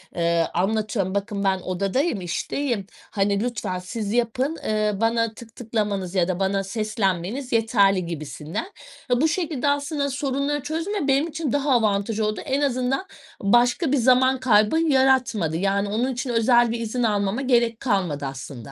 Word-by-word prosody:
eee, 170 Hz, -1 st, +1 dB
anlatıyorum 200 Hz, +1 st, -1 dB
bakın 200 Hz, 0 st, -2 dB
ben 190 Hz, -1 st, +2 dB
odadayım, 195 Hz, -, -1 dB
işteyim. 215 Hz, +5 st, -2 dB, 0.3 s
Hani 200 Hz, +1 st, +1 dB
lütfen 205 Hz, -6 st, -3 dB
siz 205 Hz, +2 st, -4 dB
yapın, 250 Hz, +6 st, 0 dB
ııı, 215 Hz, -1 st, 0 dB
bana 230 Hz, 0 st, +1 dB
tık 225 Hz, 0 st, -13 dB
tıklamanız 205 Hz, -5 st, -2 dB
ya 175 Hz, -2 st, +2 dB
da 185 Hz, -1 st, -2 dB
bana 195 Hz, 0 st, 0 dB
seslenmeniz 215 Hz, +3 st, -2 dB
yeterli 200 Hz, -5 st, +3 dB
gibisinden. 160 Hz, -, -5 dB, 0.4 s
Ve 245 Hz, +2 st, +2 dB
bu 315 Hz, -, +4 dB
şekilde 310 Hz, -5 st, -1 dB
aslında 285 Hz, 0 st, -1 dB
sorunları 280 Hz, +1 st, -1 dB
çözme 325 Hz, +2 st, -2 dB
benim 275 Hz, +4 st, +2 dB
için 315 Hz, -5 st, -3 dB
daha 285 Hz, 0 st, +1 dB
avantaj 215 Hz, -2 st, +1 dB
oldu. 215 Hz, -1 st, -1 dB
En 275 Hz, 0 st, 0 dB
azından 265 Hz, +4 st, 0 dB, 0.4 s
başka 245 Hz, -, +3 dB
bir 285 Hz, -, +3 dB
zaman 260 Hz, +1 st, +4 dB
kaybı 220 Hz, +3 st, +3 dB
yaratmadı. 260 Hz, -, +2 dB
Yani 200 Hz, +2 st, 0 dB
onun 240 Hz, +6 st, 0 dB
için 250 Hz, +1 st, -4 dB
özel 240 Hz, 0 st, +3 dB
bir 235 Hz, -, -3 dB
izin 235 Hz, +2 st, -2 dB
almama 205 Hz, +1 st, 0 dB
gerek 235 Hz, -3 st, +2 dB
kalmadı 180 Hz, -, -1 dB
aslında. 135 Hz, -1 st, -7 dB
225 Hz, 155 wpm, -23 LUFS, 195-265 Hz, 0.4 s, bu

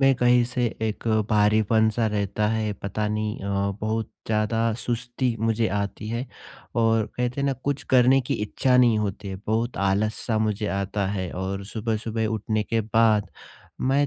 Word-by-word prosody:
में 135 Hz, 0 st, +5 dB
कहीं 125 Hz, 0 st, +4 dB
से 120 Hz, 0 st, -1 dB, 0.2 s
एक 110 Hz, +1 st, -3 dB, 0.2 s
भारीपन-सा 110 Hz, +1 st, +3 dB
रहता 105 Hz, 0 st, 0 dB
है, 110 Hz, -1 st, 0 dB
पता 100 Hz, +2 st, -3 dB
नहीं 105 Hz, 0 st, -2 dB
अ, 100 Hz, 0 st, -1 dB
बहुत 110 Hz, +1 st, -2 dB, 0.2 s
ज़्यादा 110 Hz, +1 st, +1 dB
सुस्ती 120 Hz, +1 st, -2 dB
मुझे 115 Hz, 0 st, +1 dB
आती 100 Hz, +1 st, -4 dB
है। 120 Hz, +3 st, -3 dB, 0.5 s
और 115 Hz, -2 st, +2 dB
कहते 125 Hz, +2 st, -1 dB
हैं 140 Hz, -, +1 dB
ना 140 Hz, -, +2 dB
कुछ 145 Hz, -1 st, -1 dB
करने 130 Hz, +1 st, +6 dB
की 125 Hz, -, -2 dB
इच्छा 125 Hz, +4 st, +2 dB
नहीं 120 Hz, -3 st, +5 dB
होती 100 Hz, -1 st, -3 dB
है, 95 Hz, -, -4 dB
बहुत 115 Hz, +3 st, 0 dB
आलस-सा 110 Hz, +3 st, 0 dB
मुझे 105 Hz, -1 st, 0 dB
आता 100 Hz, 0 st, -1 dB
है। 95 Hz, -3 st, -3 dB
और 95 Hz, +2 st, -4 dB
सुबह-सुबह 110 Hz, +1 st, -2 dB
उठने 110 Hz, 0 st, -1 dB
के 115 Hz, +1 st, 0 dB
बाद, 110 Hz, -2 st, +2 dB, 0.5 s
मैं 140 Hz, +2 st, +2 dB
110 Hz, 160 wpm, -25 LUFS, 105-120 Hz, 0.5 s, करने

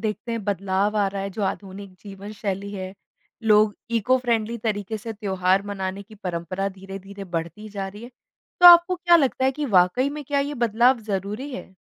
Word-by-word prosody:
देखते 220 Hz, +1 st, -3 dB
हैं 230 Hz, -3 st, -4 dB
बदलाव 200 Hz, +1 st, 0 dB
आ 205 Hz, -1 st, +3 dB
रहा 195 Hz, 0 st, -4 dB
है, 195 Hz, -, -4 dB
जो 205 Hz, +2 st, -5 dB
आधुनिक 195 Hz, 0 st, -5 dB
जीवन 200 Hz, 0 st, -9 dB
शैली 200 Hz, -1 st, -4 dB
है, 190 Hz, -1 st, -6 dB, 0.5 s
लोग 210 Hz, -1 st, +4 dB, 0.2 s
इको-फ्रेंडली 235 Hz, -1 st, 0 dB
तरीके 215 Hz, -1 st, -3 dB
से 225 Hz, +2 st, -6 dB
त्योहार 190 Hz, -2 st, 0 dB
मनाने 195 Hz, 0 st, -4 dB
की 215 Hz, +2 st, -16 dB
परंपरा 185 Hz, 0 st, -3 dB
धीरे-धीरे 195 Hz, +1 st, -9 dB
बढ़ती 190 Hz, +6 st, -5 dB
जा 195 Hz, -2 st, -5 dB
रही 205 Hz, +3 st, -11 dB
है, 245 Hz, -, -10 dB, 0.5 s
तो 355 Hz, -, +10 dB
आपको 345 Hz, +1 st, +9 dB
क्या 345 Hz, -1 st, +5 dB
लगता 265 Hz, -3 st, +1 dB
है 265 Hz, -, +3 dB
कि 300 Hz, +2 st, -4 dB
वाक़ई 245 Hz, +10 st, +2 dB
में 295 Hz, 0 st, -7 dB
क्या 280 Hz, +1 st, 0 dB
ये 290 Hz, +1 st, -3 dB
बदलाव 235 Hz, +3 st, +4 dB
ज़रूरी 205 Hz, +8 st, -3 dB
है? 190 Hz, -, -9 dB
205 Hz, 185 wpm, -24 LUFS, 195-235 Hz, 0.5 s, तो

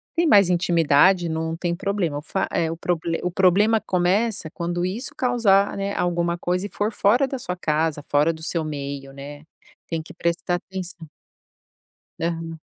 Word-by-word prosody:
tem 335 Hz, 0 st, +2 dB
mais 200 Hz, -7 st, +6 dB
intimidade, 175 Hz, 0 st, +3 dB
não 160 Hz, 0 st, -2 dB
tem 170 Hz, 0 st, -2 dB
problema. 190 Hz, -5 st, -1 dB
O -, -, -9 dB
fa 190 Hz, +5 st, -2 dB
é, 165 Hz, -1 st, 0 dB
o 165 Hz, -, -5 dB
proble 170 Hz, -1 st, -1 dB
o 180 Hz, -, -1 dB
problema 200 Hz, +5 st, +4 dB
começa 190 Hz, +1 st, +1 dB
quando 175 Hz, +1 st, -2 dB
isso 215 Hz, +8 st, -4 dB
causar, 220 Hz, -6 st, +3 dB
né, 200 Hz, 0 st, -2 dB
alguma 170 Hz, -1 st, 0 dB
coisa 180 Hz, +3 st, -1 dB
e -, -, -5 dB
for 210 Hz, +2 st, -1 dB
fora 235 Hz, +6 st, +3 dB
da 270 Hz, -, -4 dB
sua 180 Hz, -7 st, -4 dB
casa, 155 Hz, -3 st, -1 dB
fora 150 Hz, +3 st, +2 dB
do 160 Hz, -, -12 dB
seu 165 Hz, 0 st, -1 dB
meio, 140 Hz, -2 st, -5 dB
né, 145 Hz, +2 st, -9 dB, 0.4 s
tem 165 Hz, -1 st, -2 dB
que 160 Hz, -, -12 dB
prestar 170 Hz, +1 st, -1 dB
atenção. 180 Hz, -2 st, -7 dB, 1.1 s
Aham. 165 Hz, -1 st, -3 dB
175 Hz, 170 wpm, -23 LUFS, 160-195 Hz, 1.1 s, mais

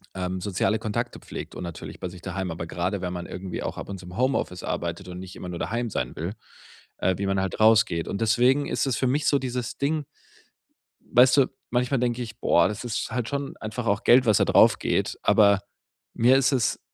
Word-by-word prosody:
ähm, 90 Hz, 0 st, -3 dB
soziale 100 Hz, +2 st, 0 dB
Kontakte 110 Hz, -1 st, -3 dB
pflegt -, -, -8 dB
und -, -, -7 dB
natürlich 85 Hz, -2 st, -8 dB
bei -, -, -4 dB
sich 90 Hz, -, -11 dB
daheim. 95 Hz, 0 st, -4 dB
Aber 85 Hz, 0 st, -5 dB
gerade 90 Hz, +4 st, -2 dB
wenn 90 Hz, 0 st, -3 dB
man 90 Hz, -1 st, -5 dB
irgendwie 90 Hz, 0 st, -6 dB
auch -, -, -4 dB
ab -, -, -7 dB
und 100 Hz, -, -5 dB
zu 90 Hz, -, -12 dB
im 90 Hz, -, -10 dB
Homeoffice 130 Hz, -8 st, 0 dB
arbeitet 85 Hz, +2 st, -4 dB
und 90 Hz, 0 st, -7 dB
nicht 95 Hz, 0 st, -9 dB
immer 90 Hz, -, -7 dB
nur 85 Hz, -, -5 dB
daheim 120 Hz, +5 st, -2 dB
sein -, -, -3 dB
will, 85 Hz, +6 st, -4 dB, 0.6 s
äh, 95 Hz, -, +1 dB
wie 100 Hz, -, -2 dB
man 95 Hz, 0 st, +1 dB
halt 95 Hz, +2 st, -3 dB
rausgeht. 110 Hz, -6 st, +4 dB
Und 100 Hz, -, -3 dB
deswegen 125 Hz, +5 st, +3 dB
ist -, -, 0 dB
es 130 Hz, -, 0 dB
für 130 Hz, -, +1 dB
mich 145 Hz, +4 st, +1 dB
so 140 Hz, -, +4 dB
dieses 125 Hz, -3 st, -4 dB
Ding, 150 Hz, +1 st, 0 dB, 1.0 s
weißt 125 Hz, +2 st, +4 dB
du, 135 Hz, -, +5 dB, 0.2 s
manchmal 125 Hz, +1 st, +1 dB
denke 125 Hz, 0 st, 0 dB
ich: 110 Hz, 0 st, -10 dB
„Boah, 85 Hz, -, +4 dB
das 105 Hz, +2 st, -5 dB
ist 115 Hz, -1 st, -3 dB
halt 120 Hz, -1 st, -2 dB
schon 140 Hz, -1 st, -3 dB
einfach 110 Hz, +2 st, -5 dB
auch 100 Hz, +3 st, +1 dB
Geld, 125 Hz, +2 st, +6 dB
was 110 Hz, -4 st, +4 dB
da -, -, +3 dB
draufgeht.“ -, -, +3 dB
Aber 100 Hz, -2 st, +5 dB, 0.6 s
mir 125 Hz, +3 st, +5 dB
ist 135 Hz, 0 st, +3 dB
es, 125 Hz, -6 st, +1 dB
110 Hz, 220 wpm, -25 LUFS, 95-125 Hz, 1.0 s, Geld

